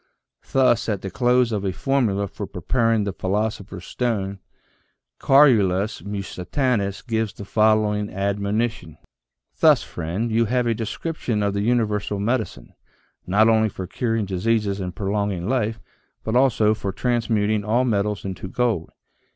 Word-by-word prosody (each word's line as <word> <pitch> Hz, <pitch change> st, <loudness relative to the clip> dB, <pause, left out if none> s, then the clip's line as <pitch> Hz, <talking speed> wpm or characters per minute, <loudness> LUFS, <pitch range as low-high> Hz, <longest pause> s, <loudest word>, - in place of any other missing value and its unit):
Thus, 130 Hz, -3 st, +3 dB
at 100 Hz, -3 st, -2 dB
the 95 Hz, -, -5 dB
close 125 Hz, -1 st, +2 dB
of 105 Hz, -3 st, -2 dB
a 95 Hz, -, 0 dB
formula 105 Hz, -3 st, 0 dB
for -, -, -7 dB
preparing 115 Hz, -4 st, 0 dB
the 100 Hz, -1 st, -3 dB
philoso 105 Hz, +4 st, -1 dB
pher's 95 Hz, -2 st, -10 dB
stone, 100 Hz, -5 st, -2 dB, 0.8 s
Carolus 110 Hz, -8 st, +4 dB
Musitanus 100 Hz, +2 st, -2 dB
gives 110 Hz, -4 st, -1 dB
the 100 Hz, -, -9 dB
following 105 Hz, -1 st, +2 dB
ad 100 Hz, +1 st, -1 dB
monition: 100 Hz, -5 st, -2 dB, 0.6 s
"Thus -, -, +5 dB
friend, 90 Hz, +8 st, -3 dB
you 115 Hz, +1 st, +3 dB
have 125 Hz, +2 st, 0 dB
a 115 Hz, -, +2 dB
description 115 Hz, 0 st, -3 dB
of 100 Hz, -1 st, 0 dB
the 100 Hz, -, -1 dB
universal 105 Hz, -3 st, 0 dB
medicine, 105 Hz, -, -2 dB, 0.5 s
not 105 Hz, +4 st, +4 dB
only 110 Hz, -1 st, +3 dB
for 95 Hz, -, -6 dB
curing 115 Hz, +3 st, -1 dB
diseases 100 Hz, +1 st, 0 dB
and 90 Hz, -2 st, -5 dB
prolonging 100 Hz, -2 st, -2 dB
life, 115 Hz, -3 st, 0 dB, 0.4 s
but 110 Hz, -, -2 dB
also 120 Hz, -5 st, +4 dB
for 100 Hz, -2 st, -4 dB
transmuting 110 Hz, -2 st, 0 dB
all 115 Hz, +5 st, +1 dB
metals 105 Hz, -3 st, -1 dB
into 95 Hz, 0 st, -5 dB
gold. 110 Hz, -5 st, -1 dB
105 Hz, 145 wpm, -23 LUFS, 100-115 Hz, 0.8 s, Thus